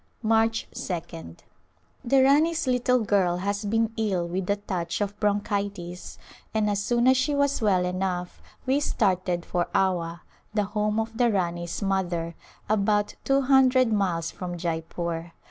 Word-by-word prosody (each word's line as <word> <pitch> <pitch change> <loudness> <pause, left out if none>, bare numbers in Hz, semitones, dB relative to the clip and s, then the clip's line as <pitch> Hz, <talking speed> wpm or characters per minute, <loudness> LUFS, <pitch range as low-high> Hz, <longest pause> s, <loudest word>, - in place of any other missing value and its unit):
March 225 +1 +2
2d. 85 - -6 0.6
The 265 +2 +4
Rani's 310 +5 +3
little 250 -1 +2
girl 190 -4 +2
has 200 +3 -2
been 225 +2 +1
ill 195 -6 0
with 180 +2 -3
a 200 - +3
touch 180 -4 -3
of 205 -1 -2
bronchitis, 200 -3 -2 0.4
and 210 -1 +2
as 200 0 -1
soon 240 +3 +2
as 260 0 +6
she 285 +3 +1
was 280 -2 +1
well 190 -4 +3
enough 180 -1 -3 0.2
we 270 +2 +2
started 185 -10 0
for 175 -1 -1
Awa, 175 -3 0 0.3
the 210 - +2
home 210 +1 -1
of 225 0 -3
the 240 -1 +4
Rani's 175 -2 -2
mother, 175 -4 -1 0.3
about 205 0 +1
two 275 0 +3
hundred 255 -3 +4
miles 180 -5 0
from 175 -1 -6
Jeypore. 165 0 -4
200 Hz, 145 wpm, -26 LUFS, 175-225 Hz, 0.6 s, as